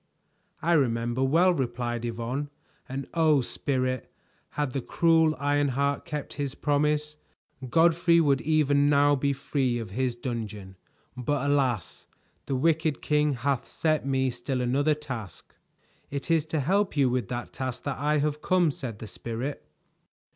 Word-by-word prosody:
"I 170 Hz, +2 st, +3 dB
remember 120 Hz, -4 st, +1 dB
well," 170 Hz, +7 st, +4 dB
replied 120 Hz, -4 st, -2 dB
Yvonne, 120 Hz, +5 st, -3 dB, 0.4 s
"and 135 Hz, +1 st, -4 dB
oh, 155 Hz, -4 st, +4 dB
Spirit, 130 Hz, 0 st, -2 dB, 0.5 s
had 145 Hz, -4 st, -1 dB
the 135 Hz, -, -1 dB
cruel 160 Hz, +2 st, +3 dB
Ironheart 140 Hz, 0 st, 0 dB
kept 150 Hz, -1 st, -5 dB
his 140 Hz, -2 st, -3 dB
promise, 150 Hz, +1 st, 0 dB, 0.5 s
Godfrey 170 Hz, +3 st, +4 dB
would 140 Hz, -4 st, +3 dB
even 145 Hz, -2 st, +3 dB
now 145 Hz, 0 st, +4 dB
be 140 Hz, +1 st, 0 dB
free 135 Hz, -2 st, -1 dB
of 115 Hz, -5 st, -6 dB
his 125 Hz, +2 st, -1 dB
dungeon; 110 Hz, -6 st, -5 dB, 0.4 s
but 140 Hz, +2 st, -1 dB
alas! 130 Hz, -, 0 dB, 0.4 s
The 135 Hz, -, -1 dB
wicked 155 Hz, +2 st, +1 dB
king 150 Hz, -1 st, +2 dB
hath 130 Hz, 0 st, -1 dB
set 155 Hz, -2 st, 0 dB
me 130 Hz, -1 st, +1 dB
still 125 Hz, +2 st, -3 dB
another 140 Hz, +5 st, +2 dB
task." 125 Hz, -, -8 dB, 0.6 s
"It 140 Hz, +4 st, -3 dB
is 160 Hz, -1 st, +2 dB
to 155 Hz, -1 st, -1 dB
help 190 Hz, +4 st, +1 dB
you 140 Hz, -2 st, +4 dB
with 125 Hz, 0 st, -1 dB
that 120 Hz, -1 st, -5 dB
task 130 Hz, -2 st, -4 dB
that 140 Hz, -2 st, -3 dB
I 150 Hz, +2 st, +2 dB
have 150 Hz, +1 st, -1 dB
come," 180 Hz, -4 st, +3 dB
said 125 Hz, -6 st, -6 dB
the 110 Hz, -, -8 dB
Spirit. 115 Hz, -, -5 dB
140 Hz, 145 wpm, -27 LUFS, 125-150 Hz, 0.6 s, well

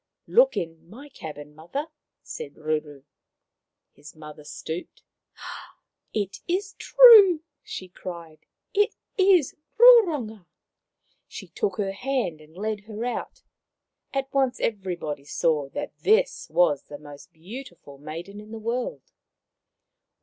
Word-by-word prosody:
" -, -, -64 dB
Look -, -, +4 dB
in 165 Hz, 0 st, -5 dB
my 270 Hz, +9 st, -12 dB
cabin, 150 Hz, -, -9 dB
mother," 220 Hz, -, -5 dB, 0.3 s
said 470 Hz, -, -8 dB
Ruru. 150 Hz, -3 st, -3 dB, 0.9 s
His 150 Hz, +2 st, -15 dB
mother 150 Hz, -1 st, -11 dB
stooped. 160 Hz, +3 st, -7 dB, 0.6 s
" -, -, -21 dB
It 195 Hz, -, -13 dB
is 390 Hz, +3 st, -1 dB
true! 425 Hz, -10 st, +8 dB
" -, -, -60 dB
she 185 Hz, -, -7 dB
cried. 170 Hz, -3 st, -9 dB, 0.2 s
" -, -, -56 dB
It 425 Hz, -, -8 dB, 0.2 s
is 375 Hz, -, +4 dB, 0.2 s
Roronga." 320 Hz, -, +5 dB, 0.8 s
She -, -, -10 dB
took 425 Hz, -, -2 dB
her 200 Hz, -2 st, -1 dB
hand 215 Hz, -, -2 dB
and 155 Hz, +3 st, -18 dB
led 210 Hz, 0 st, -3 dB
her 220 Hz, +1 st, -5 dB
out. 245 Hz, -, -5 dB, 0.7 s
At 270 Hz, 0 st, -3 dB
once 265 Hz, -2 st, +1 dB
everybody 180 Hz, -9 st, -3 dB
saw 150 Hz, -2 st, 0 dB
that 290 Hz, -, -6 dB
this 485 Hz, +4 st, +2 dB
was 150 Hz, -6 st, +2 dB
the 145 Hz, -, -9 dB
most 145 Hz, +3 st, -13 dB
beautiful 175 Hz, -, -11 dB
maiden 170 Hz, +8 st, -8 dB
in 210 Hz, -, -14 dB
the 225 Hz, -, -6 dB
world. 230 Hz, -, -3 dB
200 Hz, 130 wpm, -25 LUFS, -, 0.9 s, true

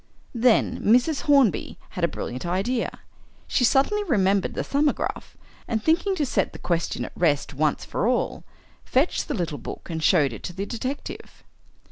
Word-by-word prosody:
Then 235 Hz, -1 st, +3 dB
Mrs. 250 Hz, +7 st, +3 dB
Hornby 275 Hz, -7 st, +3 dB
had 180 Hz, -, -6 dB
a -, -, +5 dB
brilliant 125 Hz, -6 st, -5 dB
idea. 195 Hz, +8 st, -1 dB, 0.5 s
She 250 Hz, -, +1 dB
suddenly 280 Hz, -, +3 dB
remembered 200 Hz, -, +1 dB
the -, -, -1 dB
'Thumbograph,' 290 Hz, +1 st, -1 dB, 0.3 s
and 220 Hz, -2 st, -1 dB
thinking 345 Hz, -, +2 dB
to 300 Hz, -, 0 dB
set 205 Hz, -6 st, 0 dB
the -, -, -8 dB
question 170 Hz, -1 st, -2 dB
at -, -, -8 dB
rest 155 Hz, -3 st, +1 dB
once 150 Hz, +2 st, 0 dB
for 215 Hz, -, -1 dB
all, 250 Hz, 0 st, 0 dB, 0.4 s
fetched 270 Hz, +7 st, +1 dB
the -, -, -2 dB
little 165 Hz, -, -3 dB
book 145 Hz, -, -8 dB
and 160 Hz, -1 st, -3 dB
showed 150 Hz, -6 st, +3 dB
it -, -, -8 dB
to 175 Hz, -, -6 dB
the 195 Hz, +3 st, -4 dB
detective. 255 Hz, +5 st, -6 dB
220 Hz, 165 wpm, -24 LUFS, 175-270 Hz, 0.5 s, a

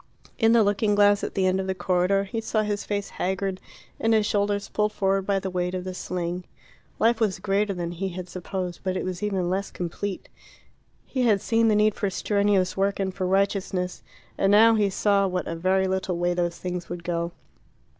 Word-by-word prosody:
In 225 Hz, -1 st, +5 dB
the 230 Hz, -2 st, +6 dB
looking 205 Hz, +1 st, +2 dB
glass 205 Hz, 0 st, +4 dB
at -, -, -4 dB
the 190 Hz, -, +2 dB
end 185 Hz, +1 st, +2 dB
of 190 Hz, -, -3 dB
the 190 Hz, -, -1 dB
corridor 185 Hz, +2 st, +1 dB
he 225 Hz, +3 st, -4 dB
saw 220 Hz, -1 st, 0 dB
his 205 Hz, -1 st, -2 dB
face 205 Hz, -1 st, -3 dB
haggard, 190 Hz, 0 st, -1 dB, 0.4 s
and 225 Hz, 0 st, +3 dB
his 215 Hz, -1 st, +3 dB
shoulders 205 Hz, -1 st, 0 dB
pulled 210 Hz, 0 st, 0 dB
forward 195 Hz, 0 st, 0 dB
by 200 Hz, -1 st, +2 dB
the 190 Hz, -1 st, -3 dB
weight 180 Hz, 0 st, -1 dB
of 180 Hz, -, -3 dB
the 185 Hz, 0 st, -5 dB
sling. 180 Hz, 0 st, -3 dB, 0.5 s
Life 230 Hz, +1 st, +3 dB
was 215 Hz, -4 st, +1 dB
greater 200 Hz, 0 st, 0 dB
than 170 Hz, -1 st, -3 dB
he 190 Hz, +3 st, -3 dB
had 180 Hz, 0 st, -6 dB
supposed, 185 Hz, 0 st, -5 dB
but 185 Hz, -1 st, -1 dB
it -, -, -3 dB
was 185 Hz, 0 st, -4 dB
even 195 Hz, -4 st, -1 dB
less 190 Hz, +2 st, -1 dB
complete. 185 Hz, +3 st, -5 dB, 0.8 s
He 260 Hz, -, -2 dB
had 220 Hz, -5 st, +4 dB
seen 225 Hz, +3 st, +2 dB
the 215 Hz, -, +4 dB
need 210 Hz, 0 st, +4 dB
for 200 Hz, -1 st, -1 dB
strenuous 200 Hz, -1 st, +1 dB
work 195 Hz, +1 st, 0 dB
and 190 Hz, -1 st, -1 dB
for 185 Hz, -1 st, -2 dB
righteousness. 190 Hz, -1 st, 0 dB, 0.4 s
And 195 Hz, -, +3 dB
now 225 Hz, +2 st, +7 dB
he 210 Hz, -2 st, +2 dB
saw 200 Hz, 0 st, +2 dB
what 180 Hz, -1 st, -2 dB
a 165 Hz, -, -3 dB
very 190 Hz, +3 st, +2 dB
little 190 Hz, -1 st, -1 dB
way 175 Hz, 0 st, +1 dB
those 175 Hz, -1 st, -1 dB
things 180 Hz, -1 st, -5 dB
would 175 Hz, 0 st, -6 dB
go. 170 Hz, 0 st, -2 dB
195 Hz, 210 wpm, -25 LUFS, 180-205 Hz, 0.8 s, now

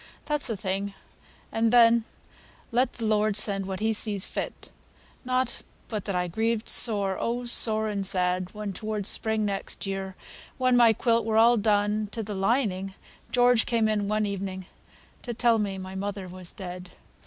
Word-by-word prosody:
"That's 295 Hz, -1 st, 0 dB
the 225 Hz, -, -3 dB
thing, 195 Hz, +1 st, -3 dB, 0.6 s
and 225 Hz, 0 st, +1 dB
then 235 Hz, -1 st, +5 dB, 0.7 s
let 245 Hz, +2 st, +1 dB
the 230 Hz, -, -4 dB
Lord 215 Hz, -1 st, +1 dB
send 195 Hz, -2 st, +1 dB
what 190 Hz, 0 st, -5 dB
He 220 Hz, +1 st, +1 dB
sees 210 Hz, -2 st, 0 dB
fit; -, -, -6 dB, 0.5 s
not 255 Hz, -1 st, -1 dB, 0.3 s
but 210 Hz, -4 st, -4 dB
that 200 Hz, -, -2 dB
I 180 Hz, 0 st, 0 dB
grieved 225 Hz, +5 st, -1 dB
sore, 200 Hz, -5 st, +5 dB
oh, 245 Hz, +1 st, -2 dB
sore 220 Hz, -2 st, +2 dB
and 205 Hz, -2 st, -2 dB
sad, 185 Hz, -1 st, +1 dB
when 210 Hz, -2 st, -5 dB
toward 215 Hz, 0 st, -4 dB
spring 220 Hz, 0 st, +2 dB
next 200 Hz, 0 st, -4 dB
year, 195 Hz, -1 st, -4 dB, 0.4 s
when 255 Hz, -1 st, +2 dB
my 240 Hz, -2 st, +6 dB
quilt 230 Hz, +1 st, +1 dB
were 220 Hz, 0 st, 0 dB
all 235 Hz, +2 st, +6 dB
done 210 Hz, -1 st, +1 dB
to 225 Hz, -, -3 dB
th' 215 Hz, -, -10 dB
lining, 195 Hz, -2 st, 0 dB, 0.4 s
George 245 Hz, -2 st, +3 dB
came 230 Hz, -2 st, +2 dB
in 210 Hz, -2 st, 0 dB
one 215 Hz, +1 st, 0 dB
evening 190 Hz, -2 st, -4 dB, 0.6 s
to 240 Hz, -2 st, -6 dB
tell 230 Hz, -1 st, +3 dB
me 200 Hz, -2 st, -2 dB
mother 190 Hz, +1 st, -5 dB
was 180 Hz, -1 st, -5 dB
dead. 180 Hz, -2 st, -8 dB
210 Hz, 165 wpm, -26 LUFS, 195-230 Hz, 0.7 s, my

